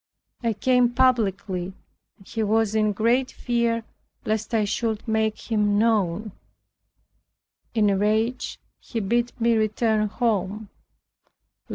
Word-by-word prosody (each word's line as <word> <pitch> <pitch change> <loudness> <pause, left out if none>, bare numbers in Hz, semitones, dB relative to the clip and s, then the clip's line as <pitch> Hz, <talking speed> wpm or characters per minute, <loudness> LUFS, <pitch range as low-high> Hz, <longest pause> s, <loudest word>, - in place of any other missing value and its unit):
I 230 -2 0
came 250 +3 +3
publicly, 200 -7 +1 0.4
and 195 - -20
he 225 - -3
was 220 0 +1
in 215 -1 +2
great 235 +5 +1
fear 235 -1 -1 0.4
lest 215 0 -1
I 220 -3 +2
should 220 +1 -2
make 220 +1 -1
him 210 -2 +2
known. 215 -2 +1 1.4
In 215 -2 +3
a 200 - +3
rage 220 +5 0 0.2
he 230 - -5
bid 235 +4 0
me 235 0 +3
return 215 0 +1
home. 210 -2 -1
220 Hz, 120 wpm, -24 LUFS, 205-235 Hz, 1.4 s, came